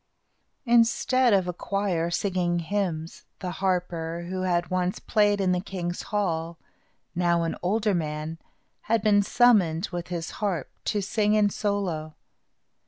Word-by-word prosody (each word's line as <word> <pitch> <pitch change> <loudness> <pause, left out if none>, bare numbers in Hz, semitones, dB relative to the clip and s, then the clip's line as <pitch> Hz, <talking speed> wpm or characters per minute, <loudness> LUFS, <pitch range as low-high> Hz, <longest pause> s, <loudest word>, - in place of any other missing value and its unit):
Instead 240 +1 +3
of 190 -3 +3
a 180 - -2
choir 180 -3 -1
singing 175 -1 0
hymns, 170 -2 -3
the 180 - -4
harper, 175 -3 -1
who 185 0 -3
had 175 -1 0
once 185 0 0
played 205 -1 +2
in 190 -2 +2
the 180 - +1
king's 180 -2 -4
hall, 170 -5 -2 0.6
now 170 -1 +2
an 165 - -2
older 210 +3 +1
man, 155 -1 -3 0.5
had 225 -2 +2
been 205 -1 +5
summoned, 200 -7 +3
with 175 -1 -4
his 170 -1 -4
harp, 185 -9 -1
to 205 -2 0
sing 210 +2 +1
in 210 -1 +3
solo. 185 -8 -2
185 Hz, 140 wpm, -26 LUFS, 170-205 Hz, 0.6 s, been